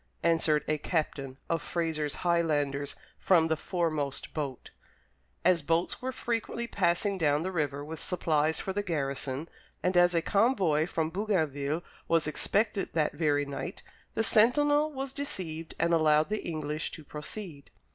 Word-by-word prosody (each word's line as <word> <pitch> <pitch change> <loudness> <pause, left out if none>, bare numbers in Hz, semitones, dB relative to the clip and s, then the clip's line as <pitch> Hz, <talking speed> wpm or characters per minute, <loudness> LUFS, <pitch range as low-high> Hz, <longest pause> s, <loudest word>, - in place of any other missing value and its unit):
_" - - -41 0.2
answered 165 -3 +3
a 155 0 0
captain 140 -5 -2
of 165 - 0
Fraser's 155 -4 -2
Highlanders 145 -5 +1 0.2
from 170 -4 +4
the 160 - +3
foremost 155 -5 -2
boat. 140 -5 -4 0.7
As 180 -2 +5
boats 165 +4 0
were 260 +1 -2
frequently 235 -1 -2
passing 195 -1 +1
down 150 -1 +2
the 185 - -2
river 145 -4 -2
with 160 +1 -6
supplies 160 -3 +1
for 190 - -3
the 205 - 0
garrison, 140 -4 -2 0.4
and 180 0 +1
as 175 0 +5
a 165 - +2
convoy 195 - +2
from 160 -2 -1
Bougainville 160 -6 0 0.2
was 165 -1 +3
expected 200 +6 0
that 155 -2 +1
very 145 -3 +1
night, 140 +7 -6 0.3
the 225 - +2
sentinel 290 +8 +4
was 270 -1 -5
deceived 180 - -4
and 170 +1 +2
allowed 155 0 +4
the 215 0 -2
English 155 -1 -2
to 160 - -8
proceed. 150 +1 -7
165 Hz, 150 wpm, -29 LUFS, 150-190 Hz, 0.7 s, As